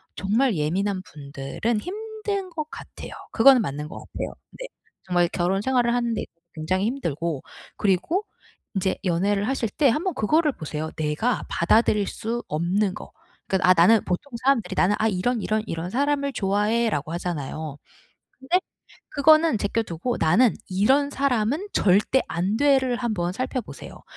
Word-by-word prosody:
정말 220 +3 +1
예민한 185 +6 -1
분들은 145 +10 -3
힘든 415 -1 -4
것 310 -3 -4
같아요. - - -10 0.2
그거는 255 +1 +6
맞는 150 -1 -4
것 - - -9
같아요 - - -6 0.2
네. - - -8 0.4
정말 175 -1 +2
결혼 190 +2 0
생활을 245 -1 +2
하는 235 -1 0
데 215 - -2 0.3
굉장히 185 +5 -1
힘들고 170 - -2 0.4
그리고 215 - +1 0.5
인제 190 0 0
연애를 200 +4 +1
하실 255 -4 -1
때 280 +6 +2
한번 340 +10 0
그거를 300 +8 +2
보세요 155 -2 -5
내가 155 +10 0
받아들일 210 +3 +3
수 235 +2 -4
없는 185 +6 0
거. - - -10 0.4
그 190 - +1
아 185 - +6
나는 205 +6 +6
보통 185 +10 -3
사람들이 260 -9 +2
'나는 200 +3 +3
아 220 - +2
이런 225 +4 0
이런 215 +1 0
이런 165 +2 -4
사람을 280 +2 0
좋아해.'라고 205 - 0
하잖아요. 155 -3 -4 0.6
근데 265 +8 +2 0.5
그거는 310 -1 +4
제껴 205 +3 0
두고 215 +6 -3
'나는 205 +9 +4 0.2
이런 260 +10 +3
사람은 275 - 0
절대 205 +7 +3
안 185 +5 -1
돼.'를 265 -3 +3
한번 210 -8 -1
살펴 255 +3 -2
보세요. - - -11
215 Hz, 320 characters per minute, -24 LUFS, 180-265 Hz, 0.6 s, 그거는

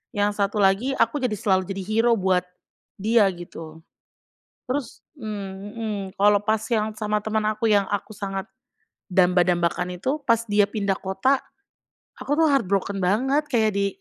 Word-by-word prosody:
Yang 205 0 +2
satu 205 +2 -1
lagi, 200 +7 +3
aku 260 +6 +2
jadi 250 - +1
selalu 190 -3 +1
jadi 195 -1 -4
hero 225 +4 +2
buat 185 -1 +2 0.6
dia, 220 +2 +4
gitu. 165 -2 -10 0.9
Terus 255 -2 -4 0.2
mmm, 205 -5 -5 0.2
mhm, 220 -2 -2 0.2
kalau 205 0 +4
pas 215 +1 0
yang 220 -2 +1
sama 210 -1 -1
teman 220 0 -1
aku 220 +1 0
yang 200 -2 +3
aku 205 +1 -3
sangat 195 -1 -4 0.7
damba-dambakan 180 -1 +2
itu, 280 +8 -1
pas 230 -2 +3
dia 205 0 +4
pindah 200 -3 -1
kota, 190 +10 +1 0.8
aku 290 - -2
tuh 325 - +4
heart 275 -6 +2
broken 195 0 0
banget, 265 +11 +1
kayak 220 -5 +2
di 200 0 +2
205 Hz, 155 wpm, -24 LUFS, 190-225 Hz, 0.9 s, dia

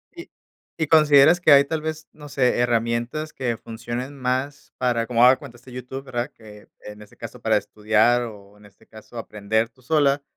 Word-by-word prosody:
¿Y 345 - -11 0.5
Y 160 -2 -1
consideras 155 +1 +5
que 155 - +4
hay 140 0 +7
tal 155 +1 -3
vez 155 0 -5
no 150 -1 -12
sé, 125 -3 +1
herramientas 120 +5 -1
que 120 -3 -3
funcionen 120 +5 -7
más 130 +2 -3
para 120 -2 0
como 120 -1 +2
has 125 - +8
de - - -4
cuenta, 135 -5 -12
este 125 +1 -16
YouTube, 125 +2 -8
¿verdad? 125 +2 -4
Que 105 -2 -16 0.2
en 105 0 -10
este 105 - -16
caso, 115 +1 -10
para 110 -2 +2
estudiar, 110 +4 +1
o 105 -3 -11
en 105 - -19
este 100 - -22
caso 110 +2 -14
aprender 110 0 -2
tú 125 +2 -27
sola, 140 0 +1
125 Hz, 195 wpm, -22 LUFS, 115-140 Hz, 0.5 s, has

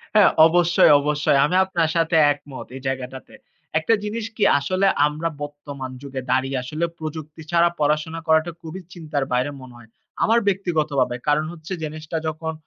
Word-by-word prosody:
হ্যাঁ, 210 - +7 0.2
অবশ্যই, 175 -1 +4
অবশ্যই 145 -1 +1
আমি 180 - -1
আপনার 170 -4 0
সাথে 165 0 +1 0.2
একমত 140 -1 -7
এই 130 - -8
জায়গাটাতে। 130 0 -5 0.5
একটা 225 +8 +1
জিনিস 215 +1 -3
কি 210 - -1 0.2
আসলে 185 +7 +1 0.2
আমরা 155 +3 -3
বর্তমান 145 -2 -7
যুগে 135 -2 -6
দাঁড়িয়ে 130 +1 +1
আসলে 155 +6 -2
প্রযুক্তি 155 0 -7
ছাড়া 170 0 +4
পড়াশোনা 155 +2 0
করাটা 160 +2 +3
খুবই 165 +4 -8
চিন্তার 155 -5 -3
বাইরে 125 +4 +1
মনে 130 -1 -12
হয়, 120 -2 -16 0.3
আমার 230 +2 +4
ব্যক্তিগতভাবে। 155 -10 0
কারণ 150 +1 +2
হচ্ছে 165 +2 -8
জিনিসটা 155 +1 -5
যখন 160 +1 -4
155 Hz, 155 wpm, -22 LUFS, 140-170 Hz, 0.5 s, হ্যাঁ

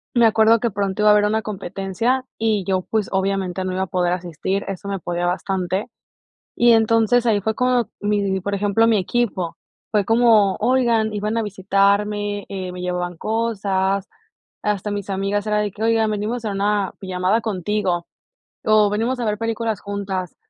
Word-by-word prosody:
me 235 - +5
acuerdo 225 +1 +5
que 235 -2 -1
pronto 200 0 -2
iba 210 - +6
a - - +8
haber 210 0 +4
una 220 +1 +1
competencia 205 +5 -2
y 220 -3 +1
yo, 190 -1 +1
pues, 215 +1 -2
obviamente, 190 -1 -1
no 185 - -2
iba 190 +1 -1
a 190 - -4
poder 180 -2 0
asistir, 180 +2 -3
eso 195 0 -6
me 195 -1 -3
podía 175 0 -2
bastante. 185 +1 -1 0.7
Y 240 0 +5
entonces, 225 +1 +3
ahí 220 -3 +3
fue 220 +2 -1
como 250 -1 +1
mi 200 -2 0
por 200 +2 -3
ejemplo, 205 +3 +2
mi 225 - +4
equipo. 190 -3 -1 0.4
Fue 210 -3 +2
como, 225 -4 +4
oigan, 230 -2 +2
iban 210 +2 -2
a - - +2
visitarme, 205 +1 0
eh, 185 -2 -5
me 180 - -7
llevaban 180 -1 -3
cosas. 200 -3 -1 0.6
Hasta 210 0 -1
mis 205 -1 -4
amigas 195 +2 -1
era 210 0 +1
de 210 -2 -1
que, 215 +3 -6
oigan, 225 -1 +2
venimos 215 +3 -2
a 210 - -1
una 200 0 0
pijamada 185 +3 0
contigo, 190 -4 -1 0.6
o 215 -1 +4
venimos 230 +5 -1
a - - -1
ver 210 -1 0
películas 225 -2 -2
juntas. 195 -3 -4
205 Hz, 175 wpm, -21 LUFS, 190-220 Hz, 0.7 s, a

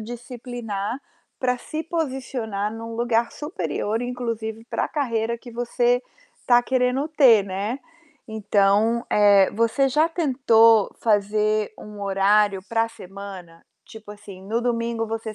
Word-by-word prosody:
disciplinar 240 -1 -6 0.4
para 250 -1 0
se 310 +5 -5
posicionar 260 -10 -3
num 230 0 -7
lugar 235 0 0
superior, 295 - -3
inclusive 230 -3 -4
para - - 0
carreira 235 -6 -1
que 240 +1 -13
você 240 +1 +1 0.4
está 245 -1 +4
querendo 255 +3 0
ter, 260 -9 +5
né. 200 +7 -4 0.5
Então, 220 +2 +2
eh, 200 -2 +5
você 230 +5 +1
já 305 +5 +2
tentou 230 - +3
fazer 215 0 +1
um 210 -1 -11
horário 200 0 +2
para 225 0 +1
semana? 190 -5 -11 0.2
Tipo 215 -2 -11
assim, 205 -2 -12
no 225 +3 -1
domingo, 230 -1 -1
você 220 -1 -5
225 Hz, 120 wpm, -23 LUFS, 210-245 Hz, 0.5 s, ter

